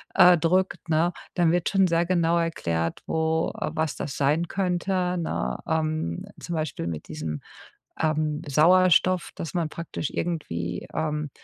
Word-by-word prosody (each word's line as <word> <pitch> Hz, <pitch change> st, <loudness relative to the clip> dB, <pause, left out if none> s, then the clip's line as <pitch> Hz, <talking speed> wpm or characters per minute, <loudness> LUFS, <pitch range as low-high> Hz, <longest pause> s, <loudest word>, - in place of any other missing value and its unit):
äh, 180 Hz, -1 st, +8 dB
drückt, 180 Hz, +1 st, 0 dB
ne? 165 Hz, +2 st, +3 dB, 0.2 s
Dann 175 Hz, -3 st, +3 dB
wird 175 Hz, 0 st, +1 dB
schon 195 Hz, -2 st, +4 dB
sehr 170 Hz, 0 st, +2 dB
genau 170 Hz, -1 st, +2 dB
erklärt, 85 Hz, -, -1 dB
wo 160 Hz, 0 st, 0 dB
was 155 Hz, -2 st, -2 dB
das 135 Hz, -, -5 dB
sein 150 Hz, +5 st, +2 dB
könnte, 180 Hz, -1 st, 0 dB
ne? 65 Hz, -, -2 dB
Ähm, 155 Hz, -, -1 dB, 0.2 s
zum 175 Hz, -, -6 dB
Beispiel 155 Hz, -, -3 dB
mit 80 Hz, -2 st, -5 dB
diesem, 75 Hz, -1 st, -5 dB, 0.6 s
ähm, 155 Hz, -1 st, 0 dB
Sauerstoff, 180 Hz, +4 st, +4 dB
dass 165 Hz, -, -6 dB
man 170 Hz, -3 st, 0 dB
praktisch 160 Hz, -2 st, -5 dB
irgendwie 85 Hz, -, -3 dB
ähm, 150 Hz, -1 st, -1 dB
160 Hz, 140 wpm, -25 LUFS, 150-175 Hz, 0.6 s, äh